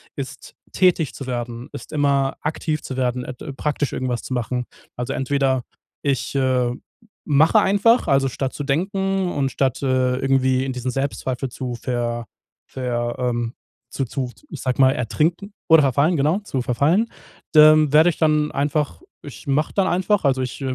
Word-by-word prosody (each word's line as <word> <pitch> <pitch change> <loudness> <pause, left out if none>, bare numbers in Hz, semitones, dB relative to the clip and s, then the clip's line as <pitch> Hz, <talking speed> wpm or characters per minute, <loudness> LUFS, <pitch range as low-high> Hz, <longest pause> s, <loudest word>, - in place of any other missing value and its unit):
ist - - -7 0.2
tätig 175 -6 +2
zu 135 - -7
werden, 120 +1 -5
ist 140 - -9
immer 140 -2 +1
aktiv 155 0 -2
zu 130 - -6
werden, 125 -1 0
et 125 - -7 0.2
praktisch 145 -1 -1
irgendwas 125 -2 -2
zu 130 - -5
machen. 125 0 -2 0.3
Also 125 - -3
entweder, 135 -1 +1 0.4
ich, 140 -3 -1
äh, 130 -2 +2 0.6
mache 155 +9 +5
einfach, 205 +3 +3
also 135 -1 +3
statt 135 +1 -3
zu 145 - -5
denken 190 +5 0
und 135 -2 -1
statt, 135 -1 0
äh, 130 -1 +1
irgendwie 130 -1 +2
in 130 - -3
diesen 125 0 -3
Selbstzweifel 135 -1 -3
zu 125 0 -5
ver 120 -1 -3 0.4
ver 120 -2 -3
ähm, 120 -1 -1 0.4
zu-zu, 130 -1 -3 0.2
ich - - -8
sag 130 0 -2
mal, 130 0 +6
ertrinken 155 - -1 0.2
oder 160 -2 +7
verfallen, 140 +6 +2
genau, 155 +8 +2
zu 135 -11 -3
verfallen, 150 - +2 0.5
dann 155 -1 +7
werde 160 +3 +7
ich 165 - -4
dann 150 -1 +2
einfach 145 - -1 0.2
ich - - -11
mache 145 +2 0
dann 195 -2 +2
einfach 185 0 +1
also, 130 -1 +2
äh, - - 0
ich 125 - -8
135 Hz, 165 wpm, -22 LUFS, 125-155 Hz, 0.6 s, oder